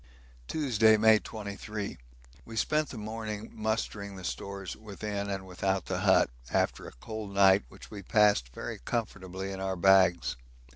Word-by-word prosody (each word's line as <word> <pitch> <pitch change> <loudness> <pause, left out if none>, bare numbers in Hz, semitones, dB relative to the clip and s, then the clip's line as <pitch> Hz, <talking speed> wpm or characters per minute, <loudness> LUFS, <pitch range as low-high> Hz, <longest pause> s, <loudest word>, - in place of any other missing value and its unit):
Tuesday, 115 -8 +4
May 110 0 +6
23. 105 -1 -6 0.5
We 115 - -10
spent 150 +6 +1
the 125 - -7
morning 110 0 -5
mustering 105 -2 -2
the 95 - -9
stores 100 0 -5
within 105 -1 -5
and 95 -1 -3
without 95 0 -1
the - - -2
hut, - - +4 0.2
after - - 0
a - - -10
cold 105 - -7
night 95 0 +6
which - - -14
we 105 -2 -7
passed 100 - +3
very - - -6
comfortably 95 - -4
in 95 - -5
our 95 0 -2
bags. 95 -4 +4
100 Hz, 150 wpm, -30 LUFS, 95-110 Hz, 0.5 s, May